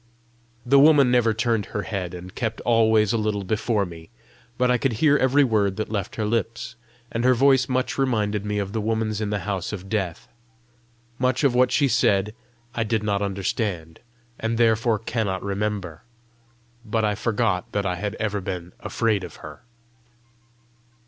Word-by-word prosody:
The 135 +3 +5
woman 140 -3 +6
never 120 -2 +3
turned 115 -2 0
her 105 - -4
head, 90 -4 -4
and 90 +1 -9
kept 115 -1 -3
always 110 -2 +3
a 115 - +1
little 105 -2 -1
before 105 +1 0
me, 85 -2 -11 0.5
but 125 0 +2
I 125 - +2
could 135 -1 0
hear 145 +6 +3
every 140 +1 +4
word 105 -6 +1
that 110 +1 -4
left 100 -4 -3
her 110 - -2
lips, 115 +1 -2 0.4
and 115 - -2
her 130 0 +4
voice 135 +1 +4
much 130 +1 -1
reminded 105 -6 0
me 105 0 -2
of 100 -1 -3
the 110 - -1
woman's 110 0 -1
in 105 - -1
the 105 -1 -2
house 95 -3 -3
of 95 -2 -7
death. 95 -7 -3 0.9
Much 130 +2 +1
of 140 -3 +4
what 125 0 +3
she 145 - +3
said, 105 -4 +2 0.4
I 115 - 0
did 110 -1 -1
not 100 -1 0
understand, 95 -4 -3 0.4
and 115 0 -1
therefore 115 -1 +3
cannot 110 -3 -2
remember. 100 -5 -3 0.8
But 110 0 0
I 105 - +1
forgot 105 -4 -1
that 100 -1 -1
I 90 - 0
had 105 +3 -3
ever 105 -2 -2
been 90 -2 -6
afraid 110 -4 0
of 85 -4 -8
her. 75 -1 -10
110 Hz, 175 wpm, -24 LUFS, 100-120 Hz, 0.9 s, woman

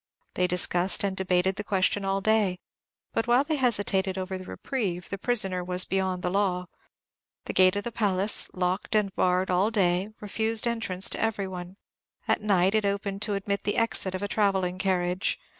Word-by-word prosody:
They 180 - +1
discussed 180 +1 +1
and 195 -1 -1
debated 190 0 +1
the 210 - -3
question 195 0 +1
all 195 0 0
day; 210 -3 +2 0.6
but 225 - 0
while 245 +3 +4
they 310 +1 -1
hesitated 200 -6 +1
over 190 0 -3
the 185 0 -7
reprieve, 190 -7 -4
the 200 - -4
prisoner 195 -6 +1
was 180 +1 0
beyond 190 -1 -1
the 180 - -1
law. 185 -2 0 0.8
The - - -4
gate 185 +1 +5
of 205 - -2
the 235 - -4
palace, 205 -2 0
locked 185 +3 -1
and 205 -2 +1
barred 185 +1 +1
all 185 +4 +3
day, 190 -2 +1
refused 220 +2 0
entrance 225 -6 +1
to - - -2
every 210 -3 -1
one; 180 0 -8 0.5
at - - +2
night, 195 -2 +2
it 215 -1 +2
opened 200 0 -2
to 210 -1 0
admit 200 0 -2
the 205 - -1
exit 210 -5 +1
of 185 - -4
a - - -1
travelling 190 -3 0
carriage. 185 -1 0
195 Hz, 185 wpm, -27 LUFS, 185-210 Hz, 0.8 s, gate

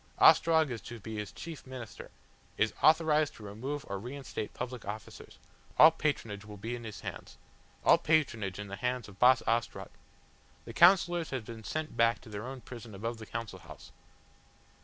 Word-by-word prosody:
Ostrog 160 -4 +6
is 115 - -4
to 120 -1 -9
be 110 +1 -7
his 105 -1 -4
chief 160 -5 -9
minister; 125 -4 -8 0.5
is - - +2
authorised 155 -1 +4
to 110 - -12
remove 130 +8 -5
or 100 0 -4
reinstate 125 -1 -6
public 125 -2 -6
officers 105 +2 -8 0.4
all 160 - +10
patronage 115 -10 -2
will 105 -1 -10
be 115 +5 -4
in 120 -1 -8
his 105 -6 -7
hands. - - -8 0.5
All - - +7
patronage 115 - +1
in 105 0 -6
the 100 0 -6
hands 125 -2 -2
of 100 -1 -15
Boss 125 0 +6
Ostrog! 115 +1 -1 0.7
The - - -8
Councillors 175 -2 +5
have 130 -5 -4
been 115 -1 -9
sent 155 +9 -4
back 115 0 +3
to 120 - -13
their 105 +3 -6
own 130 -1 -7
prison 115 -4 -10
above 115 +3 -4
the 110 - -9
Council 115 -5 -5
House." 90 - -13
120 Hz, 180 wpm, -31 LUFS, 105-140 Hz, 0.7 s, all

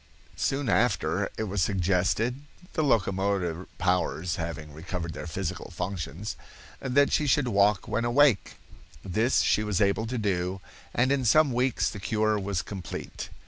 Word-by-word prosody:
Soon 135 0 -1
after 100 -6 +1
it - - -1
was 100 -2 -2
suggested—the 110 - 0
locomotor 95 - 0
powers 90 -1 0
having 80 -2 -5
recovered 85 +1 -5
their - - -6
physical 90 +2 -4
functions—that 100 - -2
she 150 - +2
should 135 0 +3
walk 100 -2 +3
when 115 - -1
awake. 120 -2 +3 0.5
This 110 +7 +2
she 105 - +2
was 105 -3 0
able 105 +2 +2
to 125 +2 -3
do, 95 -3 -1 0.3
and 130 +3 +2
in 140 -2 +2
some 145 +5 +5
weeks 125 +1 +1
the 105 - -4
cure 110 +1 +1
was 100 -2 -2
complete. 95 -4 -6
100 Hz, 140 wpm, -27 LUFS, 90-120 Hz, 0.5 s, some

